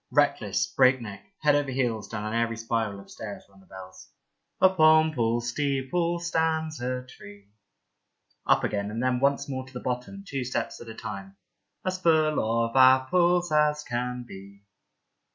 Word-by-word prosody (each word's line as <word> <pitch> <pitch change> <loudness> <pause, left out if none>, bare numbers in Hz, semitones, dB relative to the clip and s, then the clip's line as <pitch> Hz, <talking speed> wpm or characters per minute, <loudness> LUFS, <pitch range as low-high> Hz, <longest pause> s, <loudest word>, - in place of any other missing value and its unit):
Reckless, 105 -9 +1
breakneck, 120 -7 +1 0.2
head 150 -1 +5
over 145 -1 +1
heels 120 -5 -1
down 105 -2 -5
an 110 - -3
airy 115 0 0
spiral 115 -3 -2
of 100 - -14
stairs 105 -2 -8
run 95 0 -22
the 95 - -22
bells. 95 0 -12 0.3
" - - -53
Upon 160 -4 +5
Paul's 120 -2 0
steeple 145 +6 -1
stands 160 -3 -1
a 125 0 -3
tree." 100 -4 -14 1.0
Up - - +4
again 100 0 -2
and 115 +3 -3
then 130 -1 +1
once 140 +1 +1
more 130 -2 -4
to 130 - -16
the 125 - -5
bottom, 125 +12 -4
two 135 -5 -3
steps 125 - -3
at 115 - -10
a 110 - -8
time. 95 -2 -7 0.2
" - - -44
As 185 0 -2
full 155 -3 +3 0.3
of 115 - -7
apples 170 +7 +4
as 150 0 +2
can 125 0 -3
be." 100 0 -12
125 Hz, 170 wpm, -26 LUFS, 110-150 Hz, 1.0 s, head